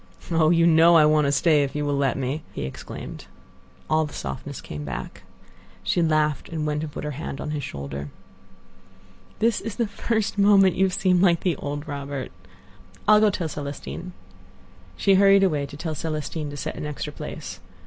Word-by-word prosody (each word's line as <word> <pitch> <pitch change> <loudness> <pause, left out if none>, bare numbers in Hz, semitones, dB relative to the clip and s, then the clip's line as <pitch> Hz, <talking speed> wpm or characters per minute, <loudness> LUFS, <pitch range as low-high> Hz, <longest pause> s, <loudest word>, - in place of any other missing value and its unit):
"Oh! 160 -1 +4
you 170 0 +4
know 170 +1 +6
I 155 - +7
want 150 -1 +4
to - - +2
stay 150 +1 +4
if 140 0 -2
you 150 0 -1
will 145 0 0
let 140 -2 +1
me!" 135 +4 -2
he - - -4
exclaimed. 65 - -8 0.6
All 155 0 +2
the 145 - -11
softness 65 -2 -6
came 75 -1 -7
back. 70 -3 -6 0.6
She 175 - +1
laughed, 155 -3 +1
and 160 -2 -3
went 150 0 -1
and 155 -1 -5
put - - -6
her 150 - -3
hand 140 -1 -6
on 150 - -4
his 150 -2 -3
shoulder. 70 - -6 1.3
"This 225 0 +1
is 210 0 -5
the 235 - +1
first 215 0 -2
moment 200 -2 +6
you 190 - +3
have 185 - -1
seemed 185 -3 +2
like 175 -3 +4
the 180 -3 +1
old 145 +1 -5
Robert. 140 -2 -5 0.8
I'll 215 0 +7
go 215 0 +5
tell 180 -4 -2
Celestine." 150 +4 -6 0.8
She 195 - +3
hurried 195 0 +6
away 150 -7 +1
to 140 0 -10
tell 160 0 -3
Celestine 155 -1 -4
to 145 - -7
set 155 +2 -4
an 150 - -4
extra 150 - -5
place. - - -7
155 Hz, 190 wpm, -24 LUFS, 145-180 Hz, 1.3 s, I